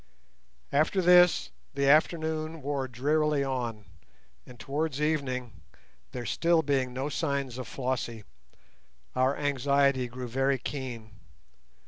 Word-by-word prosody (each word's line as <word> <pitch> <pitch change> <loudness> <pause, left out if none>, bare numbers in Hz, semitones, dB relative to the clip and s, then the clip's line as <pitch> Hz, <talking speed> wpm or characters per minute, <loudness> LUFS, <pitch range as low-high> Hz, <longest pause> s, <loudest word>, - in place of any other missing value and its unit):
After 155 +7 +2
this 180 -1 +5 0.2
the 140 0 +1
afternoon 160 +1 +2
wore 140 -1 -2
drearily 145 +4 +1
on, 120 -6 -3 0.6
and 125 -2 -13
towards 145 +1 -2
evening, 130 -8 -2 0.5
there 125 -1 -6
still 170 +5 +2
being 135 -3 0
no 130 +3 -3
signs 140 -4 -2
of 130 - -6
Flossie, 125 -4 -3 0.9
our 130 +2 +2
anxiety 140 -2 +2
grew 125 +1 -7
very 135 +3 +1
keen. 125 -4 -6
140 Hz, 110 wpm, -28 LUFS, 125-150 Hz, 0.9 s, this